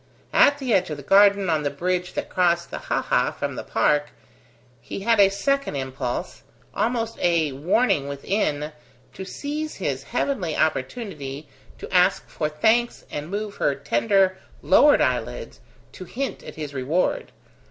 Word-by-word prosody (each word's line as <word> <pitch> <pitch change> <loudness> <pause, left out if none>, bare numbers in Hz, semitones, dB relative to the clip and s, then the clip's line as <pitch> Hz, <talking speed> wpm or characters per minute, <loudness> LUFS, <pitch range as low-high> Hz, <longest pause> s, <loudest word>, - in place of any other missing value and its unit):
At 285 - +5
the 260 -5 -1
edge 185 -3 +2
of 150 - -4
the 145 - -9
garden, 200 +3 +5
on 160 -2 +1
the 145 - 0
bridge 180 +5 -2
that - - -3
crossed 170 -1 +1
the - - -5
haha - - 0
from - - -4
the - - -5
park, 150 0 +1 0.7
he 160 - -7
had 225 +1 +2
a 195 -1 +7
second 275 - -1
impulse, 130 -2 -4 0.3
almost 230 -1 -1
a 165 -4 +2
warning 150 - +1
within, 150 0 -2 0.4
to 190 - -7
seize 300 +8 -5
his - - -3
heavenly 185 - -2
opportunity 145 - -2 0.3
to - - -9
ask 180 +1 +3
for 150 - -2
thanks 220 +10 +1
and 150 +2 -5
move 205 +1 -4
her 140 - +1
tender 190 +5 +1 0.2
lowered 290 +9 +5
eyelids - - -2 0.3
to 185 - -10
hint 270 +9 -4
at - - -10
his 150 -2 -6
reward. 155 - -1
180 Hz, 155 wpm, -23 LUFS, 150-220 Hz, 0.7 s, a